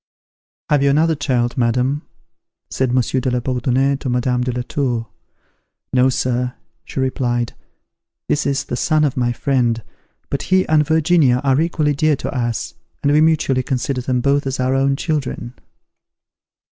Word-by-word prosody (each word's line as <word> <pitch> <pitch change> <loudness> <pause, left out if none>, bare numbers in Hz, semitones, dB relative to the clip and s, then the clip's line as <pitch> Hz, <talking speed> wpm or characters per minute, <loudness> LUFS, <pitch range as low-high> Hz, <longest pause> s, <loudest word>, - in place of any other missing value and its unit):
"Have 145 -2 +4
you 140 - +3
another 160 +4 +3
child, 130 -3 -1
madam?" 125 +4 +1 0.7
said 130 -2 0
Monsieur 130 +1 +1
de 130 - -1
la 125 0 0
Bourdonnais 130 +2 0
to 135 - -5
Madame 125 0 0
de 125 0 -1
la 125 0 -3
Tour. 120 -4 -2 0.9
"No, 130 0 +4
Sir," 125 -1 -1 0.3
she - - -6
replied; 120 -2 -1 0.7
"this 150 0 0
is 135 -1 0
the - - -4
son 155 +4 +2
of 145 -3 +1
my 120 -1 +1
friend; 120 -3 0 0.5
but 140 - -1
he 185 0 +3
and 150 -2 +3
Virginia 160 -5 +3
are 135 +1 +3
equally 155 -3 +1
dear 155 +2 +2
to - - -5
us, 120 -2 -2 0.3
and 145 - +3
we 150 +1 +4
mutually 155 -5 +2
consider 130 0 -2
them 125 0 0
both 140 +1 +1
as 135 0 -3
our 130 +1 +1
own 135 +1 +2
children." 135 -6 -3
130 Hz, 160 wpm, -19 LUFS, 125-145 Hz, 0.9 s, Have